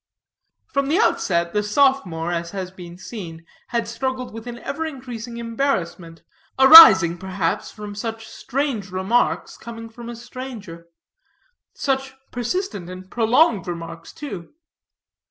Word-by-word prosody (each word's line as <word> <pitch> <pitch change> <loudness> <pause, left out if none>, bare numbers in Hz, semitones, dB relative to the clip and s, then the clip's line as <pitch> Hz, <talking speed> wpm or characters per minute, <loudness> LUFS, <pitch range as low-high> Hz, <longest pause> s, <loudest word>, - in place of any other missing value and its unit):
From 275 -1 -1
the 315 +5 +2
outset, 170 - +1
the 210 - +1
sophomore, 210 -8 +1
as 170 0 -3
has 185 -1 -6
been 175 -2 -11
seen, 170 -6 -9 0.2
had 235 -1 -2
struggled 255 +1 -4
with 225 +1 -9
an 240 0 -6
ever 285 +6 -5
increasing 245 -6 -7
embarrassment, 225 -9 -3 0.3
arising, 220 - +10
perhaps, 185 -2 -2
from 210 -1 -9
such 225 +2 -6
strange 260 -7 -3
remarks 190 +6 0
coming 230 0 -9
from 235 +1 -10
a 240 - -6
stranger 225 -8 -9 0.9
such 265 -1 -2 0.2
persistent 245 - -3
and 185 +1 -10
prolonged 230 - +2
remarks, 165 -1 -7
too. 200 - -9
225 Hz, 125 wpm, -22 LUFS, 180-260 Hz, 0.9 s, arising